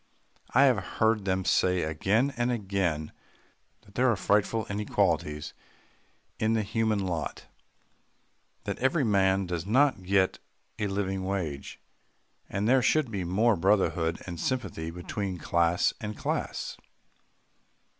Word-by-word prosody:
I 135 - +7
have 130 -7 +4 0.2
heard 110 -2 +2
them 95 -1 0
say 90 -1 +2
again 100 - +1
and 120 +1 0
again, 95 -9 -1 0.7
that 100 - -20
there 130 +3 +3
are 115 - +3
frightful 100 +4 +1
inequalities 90 -7 -1 0.9
in 110 +1 +2
the 110 -1 +1
human 110 -1 0
lot, 85 -4 -4 1.2
that - - -4
every 135 +4 +2
man 95 -3 +2
does 85 0 -4
not 130 -1 +3
get 95 0 +1 0.4
a 105 - 0
living 95 -1 -2
wage, 90 -8 -4 0.7
and 100 +2 -1
there 130 +2 +5
should 150 -2 +2
be 100 -4 -2
more 105 +6 +2
brotherhood 85 -3 +1
and 85 -2 -6
sympathy 120 -11 -2
between 90 +2 -4
class 85 +1 +2
and 105 -1 -5
class. - - -3
100 Hz, 125 wpm, -28 LUFS, 90-110 Hz, 1.2 s, I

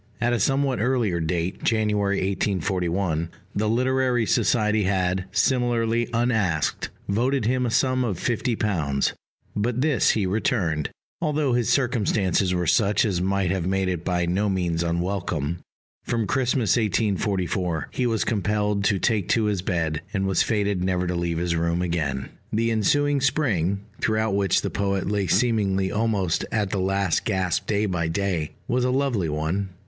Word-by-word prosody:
At 120 0 +1
a 120 - +1
somewhat 135 -3 +1
earlier 115 -7 +1
date, 85 +2 -2
January 105 -3 +1
1841, 95 -3 -1 0.3
the 105 +1 0
Literary 125 0 +1
Society 105 -2 +2
had, 95 -1 0
similarly 120 +1 +1
unasked, 110 -10 0 0.2
voted 125 +5 +1
him 125 +2 +1
a - - -1
sum 130 +3 +2
of 105 -8 -2
£50; 100 - 0 0.4
but 115 +4 0
this 150 -4 +3
he 105 -3 +2
returned, 90 - 0 0.3
although 150 -4 +1
his 120 -2 +1
circumstances 105 -7 +1
were 90 -1 0
such 100 +5 +3
as 95 -5 0
might 95 -1 0
have 95 -2 -1
made 95 0 0
it 90 -3 -2
by 90 -1 0
no 95 +4 0
means 90 -3 0
unwelcome. 85 -2 -2 0.4
From 115 -2 -1
Christmas 125 -2 +1
1844 95 -5 0
he 125 - 0
was 115 -2 +1
compelled 105 -1 0
to 100 0 +3
take 105 -2 0
to 115 - +3
his 105 -3 0
bed, 80 -5 -1
and 95 -1 0
was 95 -1 +2
fated 100 -4 0
never 90 -1 0
to 90 - -1
leave 85 -1 -1
his 85 0 0
room 85 +1 0
again. 75 -7 -2 0.2
The 115 +2 +1
ensuing 145 +6 +2
Spring, 100 - +1 0.2
throughout 110 -1 0
which 100 -2 +2
the - - -2
poet 100 -1 -1
lay 100 -1 0
seemingly 95 -2 +1
almost 105 -6 0
at 105 -3 0
the 100 - -1
last 95 -1 +1
gasp 95 -5 -1
day 105 0 +1
by 90 -4 -1
day, 85 -3 -2
was 125 0 +1
a 125 - +2
lovely 125 - 0
one. 80 +6 -2
100 Hz, 155 wpm, -24 LUFS, 90-115 Hz, 0.4 s, this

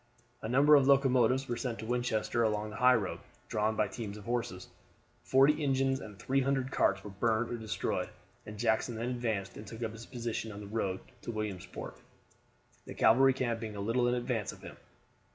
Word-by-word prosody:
A 110 - -4
number 140 +5 +5
of 140 -2 +6
locomotives 130 -1 +4
were 120 - -1
sent 120 -1 -3
to - - -7
Winchester 120 -1 0
along 105 -1 0
the 110 - -8
highroad, 125 -6 +3 0.3
drawn 110 +1 0
by 105 - +2
teams 105 -3 -6
of 105 - -10
horses. 115 -6 -3 0.5
Forty 145 +4 +4
engines 135 -1 +1
and 105 -5 -10
300 135 +3 0
cars 100 -6 +2
were 105 - -8
burned 110 +4 0
or 120 - -2
destroyed, 110 -1 -2 0.4
and 105 0 -8
Jackson 110 +1 +1
then 115 +2 -2
advanced 115 -6 -2
and 105 - -9
took 115 +3 -7
up 110 - -2
his 115 +1 -10
position 115 -3 -4
on 100 - -8
the 105 - -8
road 100 -3 -2 0.2
to - - -8
Williamsport, 105 -4 -5 0.9
the - - -8
cavalry 130 +4 +5
camp 120 -3 -1
being 110 -2 -6
a - - -6
little 115 +4 +1
in 120 - +2
advance 120 -4 -2
of - - -15
him. - - -9
115 Hz, 190 wpm, -31 LUFS, 105-125 Hz, 0.9 s, of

